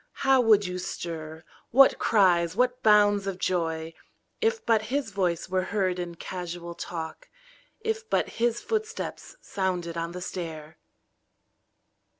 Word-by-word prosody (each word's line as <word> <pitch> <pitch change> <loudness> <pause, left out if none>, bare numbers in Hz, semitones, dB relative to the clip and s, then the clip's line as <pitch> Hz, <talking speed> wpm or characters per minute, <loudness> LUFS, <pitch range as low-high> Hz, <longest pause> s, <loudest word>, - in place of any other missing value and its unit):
How 270 -1 +6
would 215 -3 +5
you 180 0 -3
stir, 160 -3 -6 0.3
what 270 +3 +6
cries, 180 -5 +3
what 250 +2 +1
bounds 205 -2 +4
of 195 -2 -3
joy. 165 -3 -1 0.5
If 455 0 0
but 220 -2 +3
his 270 -4 -1
voice 180 -4 -1
were 185 0 0
heard 190 -3 0
in 175 -1 -5
casual 175 -1 -6
talk. 170 - -7 0.5
If 445 0 -3
but - - +2
his 235 0 +2
footstep 440 +1 -3
sounded 180 - -4
on 170 +1 -3
the 180 - -5
stair! 160 -4 -6
185 Hz, 135 wpm, -27 LUFS, 170-235 Hz, 0.5 s, How